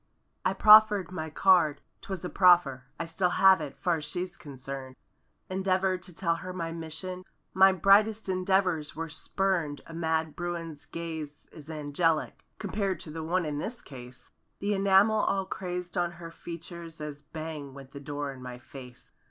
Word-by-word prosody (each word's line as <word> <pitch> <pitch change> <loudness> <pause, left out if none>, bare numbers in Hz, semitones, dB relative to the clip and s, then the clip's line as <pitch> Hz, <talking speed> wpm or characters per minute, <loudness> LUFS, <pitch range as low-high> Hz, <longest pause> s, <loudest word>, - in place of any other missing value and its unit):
I 185 - +1
proffered 210 -2 +7
my 160 -3 -4
card—twas 180 +2 +1
a - - -3
proffer— 175 -9 +4
I 170 - -2
still 180 +2 0
have 190 -1 +5
it; 140 -2 -6
far's 165 +1 0
she's 180 +4 -4
concerned; 135 -2 -8 0.5
Endeavored 185 -1 0
to 180 - -11
tell 170 -1 0
her 185 +1 -7
my 165 -2 -4
mission— 165 +3 -6 0.3
My 190 0 +7
brightest 205 +4 +4
endeavors 185 -4 +1
were 165 0 -4
spurned 165 -2 -1
A 165 - -11
mad 160 -1 -1
bruin's 170 -3 -5
gaze 160 -3 -7
is 155 -1 -13
angelic. 155 +1 -1
Compared 200 -1 -2
to 155 - -8
the 160 +1 -5
one 175 +2 0
in 145 -1 -3
this 235 +9 -5
case. 125 -2 -12 0.3
The 205 +1 -1
enamel 200 +2 +4
all 195 -2 +1
crazed 180 -2 -5
on 175 -1 0
her 170 -1 -9
features 170 -1 -9
As 150 -1 -6
bang 150 -2 -7
went 135 -1 -11
the 140 - -8
door 145 0 -4
in 130 - -12
my 125 -1 -7
face. 125 0 -12
170 Hz, 160 wpm, -29 LUFS, 150-185 Hz, 0.5 s, proffered